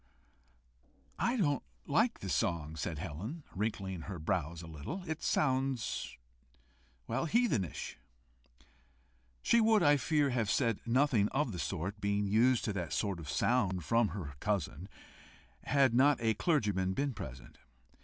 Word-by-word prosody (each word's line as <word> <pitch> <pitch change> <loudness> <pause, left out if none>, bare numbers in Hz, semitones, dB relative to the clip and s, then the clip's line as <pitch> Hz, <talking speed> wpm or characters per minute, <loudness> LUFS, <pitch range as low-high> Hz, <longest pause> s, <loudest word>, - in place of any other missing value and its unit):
"I 240 +2 +1
don't 145 - +1 0.2
like - - +1
the - - -4
song," 80 -2 -1
said 80 +1 -3
Helen, 95 - -6
wrinkling 95 -3 -3
her 95 +3 -6
brows 85 +1 -2
a - - -9
little. 80 - -6
"It 160 0 -3
sounds 130 -3 0 0.9
well, - - -1
heathenish." 160 - 0 1.4
She 235 - +4
would, 220 -3 +4
I 145 -1 +6
fear, 145 -1 +1
have 115 -4 0
said 115 -4 +1
nothing 125 -4 +3
of 135 -2 0
the 90 - -5
sort, 95 +7 -3
being 100 0 +1
used 115 +5 +3
to 110 - -1
that 90 -4 -2
kind 100 -5 -2
of 80 - -8
sound 95 -9 +1
from 115 -1 +3
her 85 -6 -6
cousin, 95 -3 -2 0.8
had 135 -4 +3
not 140 +4 +5
a 115 -1 +2
clergyman 105 - +1
been 140 -1 0
present. 65 - -9
110 Hz, 140 wpm, -33 LUFS, 90-140 Hz, 1.4 s, I